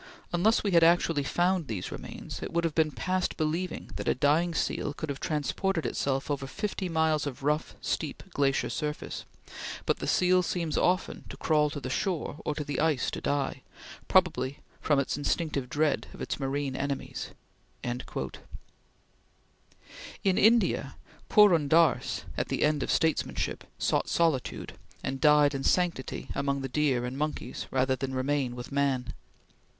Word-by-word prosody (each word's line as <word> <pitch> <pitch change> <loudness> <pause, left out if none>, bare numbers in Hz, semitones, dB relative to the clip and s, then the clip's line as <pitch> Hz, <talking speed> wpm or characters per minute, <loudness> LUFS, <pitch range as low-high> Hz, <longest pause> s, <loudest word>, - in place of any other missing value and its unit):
"Unless 205 +6 +3
we 200 - +1
had 170 -2 +6
actually 165 -2 +4
found 175 +3 +1
these 100 -6 -4
remains, - - -7
it - - -5
would 170 0 +1
have 165 -2 0
been 160 -1 +3
past 185 +4 -1
believing 165 +3 -2
that - - -5
a - - +3
dying 155 +6 +2
seal 145 -1 -1
could 160 - -5
have 140 -1 -3
transported 165 +3 -1
itself 135 +1 -1
over 140 -1 -2
fifty 190 +6 -3
miles 160 -2 +2
of 140 0 -6
rough, 150 +2 0
steep, 150 -4 -3
glacier 135 -1 +1
surface," 150 -1 -4 0.6
but - - +1
"the - - -4
seal 180 0 +4
seems 170 -3 -2
often 185 +1 +1
to - - -8
crawl 150 -2 +2
to 145 0 -5
the 135 - -5
shore 170 -3 -1
or 150 - -1
the 145 -1 -3
ice 155 -4 +2
to - - -5
die, 140 -1 -1 0.5
probably 165 -8 +2 0.2
from 150 - +2
its 140 0 0
instinctive 145 -3 -1
dread 150 +2 +1
of - - -13
its - - -3
marine 135 0 -2
enemies." 140 0 -3 0.5
In 120 +1 -2 2.4
India, 210 - +3 0.3
Purun 180 -8 +6
Dass, 160 -2 +3
at - - 0
the - - 0
end 150 -1 +2
of - - -2
statesmanship, 160 -1 0
sought - - +1
solitude, 160 -7 0 0.3
and 135 0 -3
died 150 -1 +6
in 135 0 -3
sanctity 175 -6 0
among 140 0 -1
the 135 - -4
deer 130 -3 +1
and 125 +1 -4
monkeys, 150 0 -3
rather 130 0 +2
than 130 0 -4
remain 130 -1 0
with 120 +2 -8
man. 135 -3 0
150 Hz, 155 wpm, -29 LUFS, 135-170 Hz, 2.4 s, had